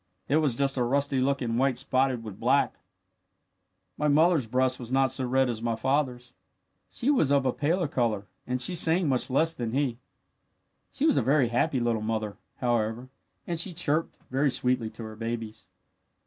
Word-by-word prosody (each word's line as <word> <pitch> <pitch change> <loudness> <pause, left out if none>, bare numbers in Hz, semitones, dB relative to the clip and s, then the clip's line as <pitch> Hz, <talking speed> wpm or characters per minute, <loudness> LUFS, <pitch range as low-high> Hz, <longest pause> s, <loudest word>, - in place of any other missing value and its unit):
It 145 - +3
was 150 -6 +1
just 135 +1 0
a 125 - +2
rusty 140 +2 0
looking 130 -4 0
white 130 -1 +2
spotted 130 -2 +1
with 105 -4 -9
black. - - +2 1.3
"My 150 - +1
mother's 155 -2 +3
breast 130 +2 +1
was 120 -1 -8
not 135 0 +3
so 130 - -1
red 130 +1 +2
as 115 -2 -3
my 115 -1 -1
father's. 125 -1 -1 0.6
She 260 +4 0
was 200 - +2
of 140 -1 +3
a 130 - +1
paler 165 +4 0
colour 115 -7 -1 0.2
and 125 +1 -1
she 180 - +2
sang 170 0 +3
much 130 -2 0
less 160 +5 +2
than 120 -6 -4
he. 130 -4 0 0.9
She 285 - -1
was 315 - +3
a - - +4
very 135 -3 +2
happy 130 +3 +1
little 120 -2 0
mother, 110 -1 -2 0.2
however, 120 0 -1 0.4
and 170 -2 -3
she 180 +2 -1
chirped 160 -1 -1
very 135 +2 +2
sweetly 125 -2 0
to 115 - -10
her 110 0 -8
babies. 115 -1 -5
130 Hz, 180 wpm, -27 LUFS, 120-145 Hz, 1.3 s, a